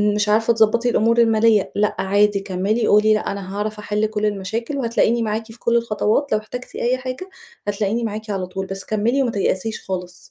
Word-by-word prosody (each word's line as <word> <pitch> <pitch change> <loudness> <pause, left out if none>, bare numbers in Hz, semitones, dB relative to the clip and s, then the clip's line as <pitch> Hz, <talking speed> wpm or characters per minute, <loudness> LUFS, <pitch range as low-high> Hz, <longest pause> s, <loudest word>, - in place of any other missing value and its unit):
مش 210 0 +1
عارفة 225 +2 +3
تضبطي 230 +2 +3
الأمور 230 0 +2
المالية، 225 -2 +3
لأ 210 0 +1
عادي 200 +1 +2
كمِّلي 195 +4 -1
قولي 210 +1 +5
لأ 215 - -1
أنا 195 0 -6
هاعرف 210 +1 -3
أحل 210 +1 -1
كل 215 0 -2
المشاكل، 215 +6 -2
وهتلاقيني 235 -2 +1
معاكِ 220 +1 -2
في 230 - -14
كل 235 - +1
الخطوات 230 +4 0
لو - - +4
احتجتِ 245 +4 -9
أي 250 +2 0
حاجة، 255 +9 -6 0.4
هتلاقيني 205 +3 -1
معاكِ 215 0 -4
على 195 -3 -2
طول 190 +1 -5
بس 195 0 -6
كمّلي 230 +6 +1
وما 240 - 0
تيأسيش 205 +1 -1
خالص. 180 -2 -5
215 Hz, 190 wpm, -21 LUFS, 205-230 Hz, 0.4 s, قولي